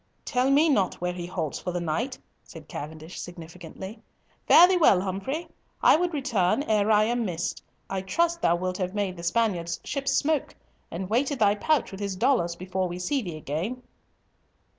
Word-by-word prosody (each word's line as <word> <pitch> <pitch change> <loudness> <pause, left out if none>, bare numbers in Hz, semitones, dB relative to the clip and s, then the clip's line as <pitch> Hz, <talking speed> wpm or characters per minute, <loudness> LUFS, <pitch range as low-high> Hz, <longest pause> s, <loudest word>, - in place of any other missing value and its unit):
"Tell 255 -1 +1
me 290 +4 +5
not 205 - +2
where 180 0 -3
he 175 -1 -6
halts 165 -5 -3
for 180 - -4
the 175 - -2
night," 195 - -2 0.3
said 160 -3 -12
Cavendish 155 +3 -7
significantly. 175 +4 -9 0.5
"Fare 350 - +9
thee 375 - +2
well, 255 - +5
Humfrey. 200 - -3 0.4
I - - +7
would 350 +2 0
return 260 - +1
ere 215 -4 +1
I 215 -1 +5
am 240 +2 0
missed. 175 -4 -3 0.3
I 195 -1 -3
trust 335 - 0
thou 170 - +3
wilt 185 +1 -3
have 185 +1 -2
made 200 -3 -1
the 170 - -9
Spaniard's 170 -3 0
ships 275 -1 -2
smoke, 305 -1 0 0.3
and 185 +2 -5
weighted 265 +7 +1
thy 205 -3 +4
pouch 285 +7 +1
with 195 - -8
his 200 -2 -3
dollars, 180 -5 +1
before 185 +1 -2
we 175 0 -5
see 265 +10 -1
thee 175 -7 -6
again." 175 - -4
195 Hz, 185 wpm, -26 LUFS, 175-255 Hz, 0.5 s, Fare